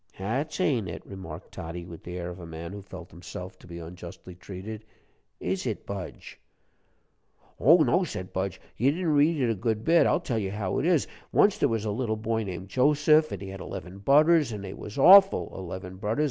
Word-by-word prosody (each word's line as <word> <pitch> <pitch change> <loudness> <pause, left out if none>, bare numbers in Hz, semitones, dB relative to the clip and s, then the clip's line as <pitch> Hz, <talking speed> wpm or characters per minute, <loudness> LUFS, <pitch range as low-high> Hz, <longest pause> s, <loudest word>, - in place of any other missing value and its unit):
"That's 130 - -2
ain't 125 - +1
it," 85 - -7
remarked 90 -4 -9
Toddie, 85 0 -7
with 85 -2 -10
the 90 0 -6
air 90 0 -4
of 90 - -10
a 85 - -8
man 80 +1 -7
who 100 - -7
felt 95 -2 -11
himself 90 +2 -9
to - - -16
be 85 -1 -8
unjustly 85 +2 -9
treated. 100 +4 -8 0.6
"Is - - -2
it, - - -4
Budge?" 100 -2 -7 1.2
"Oh, 160 +3 +6
no," 185 - +3
said 95 - -6
Budge, 95 -1 -2 0.2
"you 130 +5 +3
didn't 165 +1 0
read 150 +2 +3
it 115 -7 0
good 110 -2 +1
a - - -11
bit; 165 +8 +4
I'll - - +3
tell 125 -10 -2
you 100 -2 -2
how 100 -2 -2
it 160 - 0
is. 170 -6 +3 0.3
Once 205 -1 +4
there - - +3
was 110 -2 -1
a 105 - 0
little 110 0 -1
boy 110 +1 -1
named 95 -1 -6
Joseph, 150 +5 +4
an' 100 - -5
he 95 - -6
had 95 0 -8
eleven 90 +4 -7
budders 150 +6 +5
they 100 -3 -6
was 105 +3 -9
awful 195 +7 +7
eleven 95 0 -7
budders. 105 +6 -2
100 Hz, 205 wpm, -27 LUFS, 90-140 Hz, 1.2 s, awful